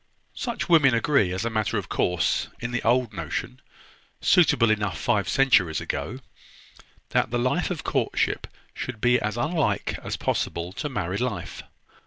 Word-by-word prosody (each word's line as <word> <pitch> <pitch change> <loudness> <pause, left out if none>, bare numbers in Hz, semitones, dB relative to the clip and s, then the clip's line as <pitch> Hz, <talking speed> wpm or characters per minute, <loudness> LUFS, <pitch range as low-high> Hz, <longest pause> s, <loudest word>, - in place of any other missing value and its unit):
"Such 240 -2 -3
women 150 -8 +5
agree, 115 -5 +2
as 95 +5 -2
a 115 - -1
matter 110 -5 0
of - - -3
course, 90 -1 0
in 120 +1 -4
the 125 - -1
old 120 -1 +2
notion, 80 -7 -4 0.6
suitable 145 - +4
enough 105 -7 -1
five 100 -6 +1
centuries 110 -12 +3
ago, 80 - -4 0.9
that - - +1
the 120 - -1
life 130 +8 0
of 180 -4 -4
courtship - - 0 0.3
should 125 -4 -6
be 125 +2 +3
as 110 +2 -3
unlike 155 +4 0
as - - -3
possible 85 +2 -2
to 150 - -4
married 100 -5 -2
life. 100 -9 -3
115 Hz, 155 wpm, -25 LUFS, 95-130 Hz, 0.9 s, women